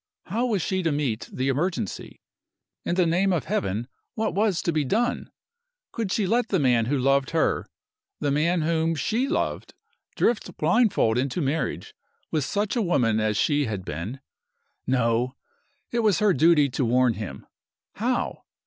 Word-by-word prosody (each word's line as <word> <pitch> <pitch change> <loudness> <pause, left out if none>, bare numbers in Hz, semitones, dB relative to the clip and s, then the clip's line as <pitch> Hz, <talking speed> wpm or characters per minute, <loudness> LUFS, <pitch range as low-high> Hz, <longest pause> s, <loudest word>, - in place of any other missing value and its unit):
How 230 +7 -1
was 205 -8 0
she 190 -1 -1
to 165 -3 0
meet 140 -6 -2
the 130 +1 -2
emergency? 135 - -2 0.6
In 175 - -1
the 180 -1 +3
name 180 +4 +2
of 170 -6 0
Heaven, 100 +5 -2 0.3
what 220 -5 -1
was 200 -3 +1
to 170 - +1
be 155 -2 +1
done? 230 - 0 0.6
Could 225 -5 -3
she 210 - +1
let 235 +5 +1
the 195 - +1
man 125 -6 +3
who 140 +4 0
loved 135 0 +2
her - - 0 0.5
the 145 - 0
man 165 +4 +1
whom 165 0 +1
she 225 - 0
loved - - -2 0.4
drift 215 -6 0
blindfold 155 - +2
into 135 +5 -1
marriage 140 -3 -2 0.4
with 155 -3 +1
such 205 - -1
a 240 - +1
woman 120 - +2
as 110 -1 0
she 145 +3 +2
had 100 -5 -4
been? 85 - -5 0.7
No! 125 0 +1 0.6
it 235 - 0
was 215 -6 +3
her 210 -2 +3
duty 150 0 +5
to 130 +2 -1
warn 125 0 +3
him. 100 -11 -7 0.5
How? - - -1
150 Hz, 165 wpm, -25 LUFS, 125-190 Hz, 0.7 s, duty